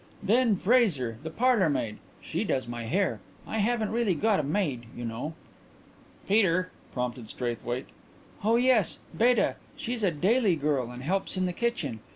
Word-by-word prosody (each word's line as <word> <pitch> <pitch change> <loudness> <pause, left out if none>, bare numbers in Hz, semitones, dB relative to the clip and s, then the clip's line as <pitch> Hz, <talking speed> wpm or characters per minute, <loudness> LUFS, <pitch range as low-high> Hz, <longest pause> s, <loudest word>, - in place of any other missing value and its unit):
Then 230 0 +4
Fraser, 185 - +2
the 160 - -5
parlourmaid. 165 - +1 0.2
She - - -2
does 130 -2 -1
my 120 -1 -5
hair 190 - 0 0.3
I 220 - -3
haven't 220 0 +1
really 225 -5 +1
got 210 +5 +2
a - - 0
maid, 140 - -1
you 120 - -4
know." 120 +8 -4 0.9
"Peter," 185 -3 +3 0.2
prompted 125 -3 -4
Straithwaite. 120 0 -3 0.6
"Oh 225 +2 +4
yes, 240 -6 +3 0.2
Beta. 240 0 +3 0.2
She's 245 -4 -3
a 200 - +3
daily 195 - +2
girl 140 -5 0
and 125 +1 -8
helps 190 +5 -1
in 185 - +1
the 180 - -1
kitchen. 175 - -2
185 Hz, 155 wpm, -28 LUFS, -, 0.9 s, Then